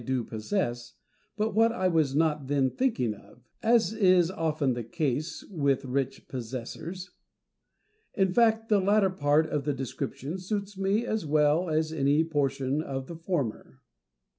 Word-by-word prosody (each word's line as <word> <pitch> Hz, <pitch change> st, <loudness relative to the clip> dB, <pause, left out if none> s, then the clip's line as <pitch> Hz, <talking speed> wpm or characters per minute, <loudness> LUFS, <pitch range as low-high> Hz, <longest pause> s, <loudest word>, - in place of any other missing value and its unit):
do 130 Hz, 0 st, -1 dB
possess, 120 Hz, -, -3 dB, 0.4 s
but 215 Hz, 0 st, 0 dB
what 225 Hz, +2 st, +4 dB
I 185 Hz, -5 st, 0 dB
was 155 Hz, -6 st, +1 dB
not 150 Hz, -3 st, +1 dB
then 135 Hz, -2 st, +1 dB
thinking 220 Hz, -, 0 dB
of; 105 Hz, +4 st, -18 dB, 0.2 s
as 230 Hz, -1 st, +3 dB
is 185 Hz, -5 st, +4 dB
often 155 Hz, -6 st, 0 dB
the 120 Hz, -1 st, -4 dB
case 155 Hz, -, -2 dB
with 140 Hz, -5 st, 0 dB
rich 135 Hz, +1 st, -2 dB
possessors; 130 Hz, +9 st, -6 dB, 1.0 s
in 190 Hz, -2 st, +2 dB
fact, 225 Hz, -1 st, +3 dB
the 210 Hz, -2 st, +4 dB
latter 200 Hz, 0 st, +3 dB
part 150 Hz, -2 st, +2 dB
of 150 Hz, -2 st, -2 dB
the 145 Hz, +1 st, 0 dB
description 135 Hz, +5 st, -5 dB
suits 200 Hz, +2 st, -4 dB
me 195 Hz, +4 st, 0 dB
as 220 Hz, -3 st, -1 dB
well 150 Hz, +3 st, +3 dB
as 155 Hz, 0 st, 0 dB
any 145 Hz, +1 st, +3 dB
portion 140 Hz, -2 st, 0 dB
of 135 Hz, -4 st, -4 dB
the 170 Hz, -, -8 dB
former. 165 Hz, -, -3 dB
155 Hz, 150 wpm, -28 LUFS, 135-190 Hz, 1.0 s, what